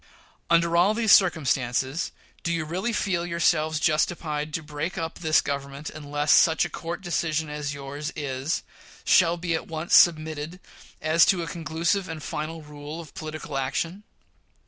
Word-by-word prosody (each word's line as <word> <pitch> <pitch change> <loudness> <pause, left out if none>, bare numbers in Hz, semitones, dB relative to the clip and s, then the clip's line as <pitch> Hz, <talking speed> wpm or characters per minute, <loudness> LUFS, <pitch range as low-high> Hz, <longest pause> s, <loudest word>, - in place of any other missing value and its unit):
Under 170 0 +3
all 185 +5 +4
these 225 -2 +2
circumstances, 135 -4 +2 0.3
do 170 - -2
you 165 -2 -1
really 185 +9 -2
feel 190 -5 0
yourselves 165 -2 +1
justified 155 -1 0
to 160 - -3
break 150 +4 -4
up 165 0 -4
this 155 -2 +3
Government 140 +1 -5
unless 145 0 -1
such 160 -1 +5
a - - -6
court 170 +2 -5
decision 160 -4 -1
as 150 -1 -4
yours 145 +2 -5
is 140 +1 -2 0.4
shall 170 -1 +4
be 170 -1 -2
at 160 - -2
once 160 0 -4
submitted 155 -1 +4
to 180 - -14 0.4
as 160 +2 +5
a 175 -3 -2
conclusive 165 +4 -1
and 160 -2 -6
final 155 +1 -5
rule 150 +1 -8
of 160 -4 -10
political 155 -2 -6
action? 165 +8 -2
160 Hz, 155 wpm, -25 LUFS, 150-170 Hz, 0.4 s, such